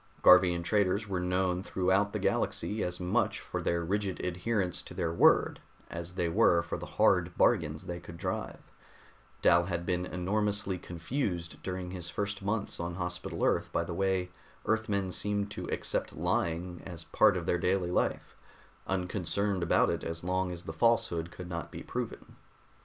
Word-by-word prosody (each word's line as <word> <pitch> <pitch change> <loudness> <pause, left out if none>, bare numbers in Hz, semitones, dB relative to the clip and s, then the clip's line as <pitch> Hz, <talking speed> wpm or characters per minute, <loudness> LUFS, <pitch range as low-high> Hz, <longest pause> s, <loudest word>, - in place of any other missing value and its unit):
Garvian 90 -1 +7
traders 100 +2 +1
were 95 -2 -1
known 90 0 0
throughout 95 +2 +1
the - - -2
Galaxy 105 +6 0
as 90 0 -2
much 90 0 +1
for - - -4
their 85 0 0
rigid 100 +1 -1
adherence 90 +1 -1
to - - -11
their 85 -3 -1
word - - +4 0.3
as 85 +1 -6
they 90 -2 0
were 85 +1 +4
for 85 - -4
the - - -6
hard - - +3
bargains 80 -1 +2
they 85 0 -4
could 85 - -10
drive; 90 +1 -4 0.7
Dal 85 0 +5
had 85 -1 -3
been 90 0 -1
enormously 100 +1 0
confused 85 - -3
during 90 -1 -4
his 90 -2 -5
first 100 +3 -3
months 105 +1 -2
on 85 0 -3
Hospital 90 0 -4
Earth - - +1
by - - +1
the 85 - -5
way 95 0 0 0.3
Earthmen 105 -4 0
seemed 100 +2 -1
to - - -5
accept - - -1
lying 85 +2 -1
as 85 -3 -8
part 90 - +4
of 85 - -4
their 90 - +1
daily 90 0 +1
life, - - -1 0.5
unconcerned 95 +1 -1
about 85 - +3
it - - -3
as 80 0 -5
long 90 0 0
as 85 -1 -6
the 80 - -6
falsehood 85 -4 +2
could 90 +1 -9
not 85 -1 -5
be - - -8
proven. - - -5
90 Hz, 170 wpm, -31 LUFS, 85-95 Hz, 0.7 s, Garvian